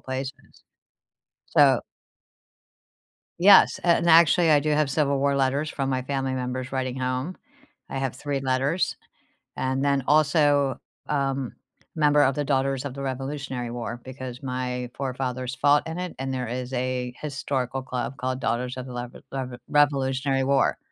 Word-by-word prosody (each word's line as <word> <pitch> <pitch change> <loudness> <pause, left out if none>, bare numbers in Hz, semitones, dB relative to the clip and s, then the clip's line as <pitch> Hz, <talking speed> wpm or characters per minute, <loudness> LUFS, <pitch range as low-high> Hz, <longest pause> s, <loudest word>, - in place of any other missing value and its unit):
places, 130 +1 -7 0.8
so - - +5 1.6
Yes, 195 +2 +7
and 170 0 +3
actually 165 0 +6
I 150 -2 +6
do 155 +1 -1
have 150 -2 +2
Civil 140 -1 +1
War 140 0 +2
letters 140 +3 +1
from 135 -1 -2
my 130 -1 0
family 135 -1 -2
members 130 +1 -4
writing 130 -1 -2
home. 130 +7 -2 0.5
I - - -4
have 135 -2 -2
3 140 +1 -3
letters 135 +6 0 0.6
and 130 +1 -1
then 140 -2 +1
also, 145 -2 +3 0.3
um, 135 -3 -1 0.4
member 150 -1 +4
of 135 -1 +2
the 145 - 0
Daughters 135 -1 0
of 135 - -5
the 140 - -6
Revolutionary 135 -2 -4
War 120 0 -5
because 130 -1 -7
my 125 -1 -3
forefathers 130 -1 -3
fought 145 +1 +4
in 165 +2 -5
it 180 -1 -4
and 135 0 -3
there 125 -1 -2
is 125 +2 -5
a 125 -1 -2
historical 135 -3 -3
club 130 +1 -4
called 130 0 -2
Daughters 125 +2 -1
of 130 - -6
the 125 - -8
lever 120 0 -7
lever 130 -2 -4
Revolutionary 135 -2 +2
War. 135 0 +2
135 Hz, 150 wpm, -25 LUFS, 130-145 Hz, 1.6 s, Yes